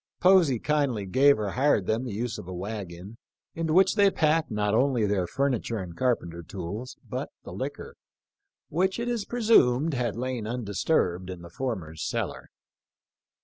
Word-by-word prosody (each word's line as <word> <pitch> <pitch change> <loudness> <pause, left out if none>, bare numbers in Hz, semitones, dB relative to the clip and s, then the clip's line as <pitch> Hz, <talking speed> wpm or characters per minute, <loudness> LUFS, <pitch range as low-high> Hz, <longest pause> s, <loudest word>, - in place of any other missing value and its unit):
Posey 180 -8 +5
kindly 140 -6 0
gave 140 +9 +5
or 105 -2 -2
hired 130 -6 +2
them 110 +5 0
the 120 - -4
use 110 +2 -3
of - - -9
a 95 - -6
wagon, 100 +1 -7 0.3
into 165 -1 -2
which 190 +3 +5
they 205 -2 +5
packed 160 -2 +1
not 105 -2 0
only 125 -1 +2
their 100 -3 0
furniture 130 -3 -1
and 90 -4 -6
carpenter 85 -8 -1
tools, 100 +9 -6
but - - -4
the - - -9
liquor, - - -5 0.8
which 185 +4 +1
it 235 0 -3
is 235 -4 -1
presumed 165 - +3
had 120 -4 -1
lain 125 -2 -3
undisturbed 100 - 0
in 90 -2 -7
the 85 - -11
former's 90 -9 -4
cellar. - - -3
120 Hz, 160 wpm, -27 LUFS, 100-150 Hz, 0.8 s, Posey